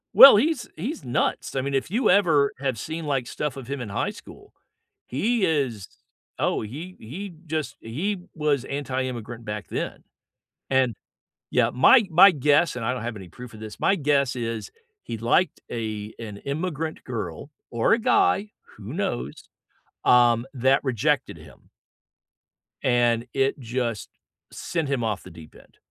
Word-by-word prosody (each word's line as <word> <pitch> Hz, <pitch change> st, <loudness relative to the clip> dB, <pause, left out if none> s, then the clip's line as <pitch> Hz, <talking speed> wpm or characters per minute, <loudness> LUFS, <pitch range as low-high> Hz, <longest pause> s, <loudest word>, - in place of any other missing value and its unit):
Well, 275 Hz, -, +11 dB
he's 265 Hz, +3 st, +1 dB
he's 265 Hz, -, -5 dB
nuts. 120 Hz, +2 st, -1 dB
I 135 Hz, -, +1 dB
mean, 140 Hz, +1 st, -3 dB
if 135 Hz, +3 st, 0 dB
you 225 Hz, +4 st, +1 dB
ever, 160 Hz, -8 st, +4 dB
have 135 Hz, -3 st, -1 dB
seen, 160 Hz, +8 st, -5 dB
like, 135 Hz, -4 st, -1 dB
stuff 150 Hz, 0 st, -3 dB
of 135 Hz, -3 st, -9 dB
him 140 Hz, +1 st, -4 dB
in 120 Hz, -4 st, -5 dB
high 100 Hz, -, -1 dB
school, -, -, -13 dB, 0.5 s
he 210 Hz, -, +1 dB
is 135 Hz, -, -1 dB, 0.5 s
oh, -, -, 0 dB
he 155 Hz, -, -7 dB
he 180 Hz, -, -7 dB
just, 155 Hz, -1 st, -3 dB
he 170 Hz, -, -3 dB, 0.2 s
was 150 Hz, -4 st, 0 dB
anti 135 Hz, -2 st, -2 dB
immigrant 120 Hz, -2 st, -6 dB
back 105 Hz, 0 st, -5 dB
then. -, -, -4 dB, 0.7 s
And 130 Hz, -3 st, +2 dB, 0.6 s
yeah, -, -, +3 dB
my 220 Hz, -, +6 dB
my 185 Hz, +5 st, +8 dB
guess- 150 Hz, +2 st, +3 dB
and 120 Hz, -, -4 dB
I 125 Hz, -, +1 dB
don't 125 Hz, -3 st, -4 dB
have 115 Hz, -1 st, -4 dB
any 95 Hz, -3 st, -9 dB
proof 125 Hz, +6 st, -11 dB
of 110 Hz, -, -11 dB
this- 110 Hz, -1 st, -8 dB
my 195 Hz, -, +3 dB
guess 140 Hz, -5 st, +1 dB
is, 115 Hz, -2 st, -4 dB, 0.3 s
he 115 Hz, -, -6 dB
liked 120 Hz, +9 st, +1 dB
a 110 Hz, -2 st, -4 dB
an 105 Hz, -3 st, -7 dB
immigrant 155 Hz, -, -4 dB
girl- 110 Hz, -, -5 dB, 0.2 s
or 115 Hz, -1 st, +2 dB
a 225 Hz, -, +5 dB
guy, 255 Hz, -, +2 dB, 0.3 s
who -, -, -8 dB
knows- 65 Hz, +4 st, -4 dB, 0.6 s
um, 120 Hz, -1 st, +5 dB
that 130 Hz, +1 st, +2 dB
rejected 130 Hz, -, 0 dB
him 75 Hz, -5 st, -17 dB, 1.1 s
and 120 Hz, -1 st, +2 dB
it 135 Hz, +1 st, +1 dB
just 120 Hz, -3 st, -3 dB, 0.4 s
sent 165 Hz, -4 st, -3 dB
him 135 Hz, -4 st, 0 dB
off 110 Hz, -3 st, -2 dB
the -, -, -11 dB
deep 80 Hz, -2 st, -14 dB
end. -, -, -19 dB
130 Hz, 160 wpm, -25 LUFS, 115-155 Hz, 1.1 s, Well